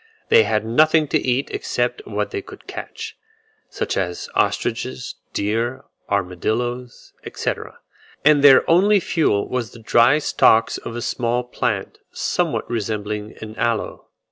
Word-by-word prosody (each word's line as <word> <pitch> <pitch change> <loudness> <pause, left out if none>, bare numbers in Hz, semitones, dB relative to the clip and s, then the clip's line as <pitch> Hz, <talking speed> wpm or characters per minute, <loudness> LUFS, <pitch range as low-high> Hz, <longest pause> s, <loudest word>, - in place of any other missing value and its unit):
They 460 -1 +6
had - - 0
nothing 155 +6 +4
to - - +2
eat 130 +2 -1
excepting 405 0 -2
what - - -1
they 400 -1 -3
could - - -13
catch, - - -7 0.5
such - - -3
as 90 -2 -3
ostriches, 125 +2 -1 0.2
deer, 115 +5 -1 0.3
armadilloes, 110 +6 -2
etc., - - -4 0.5
and 150 -2 +5
their 135 -2 +7
only 200 +5 +5
fuel 155 - +1
was 125 -3 -3
the 120 - -12
dry 120 +5 +4
stalks 115 -6 +3
of 115 - -7
a 120 - -4
small 120 0 -1
plant, 125 - -3
somewhat - - -1
resembling 105 -1 -3
an 110 0 -8
aloe. 115 -2 -2
120 Hz, 135 wpm, -21 LUFS, 110-145 Hz, 0.5 s, their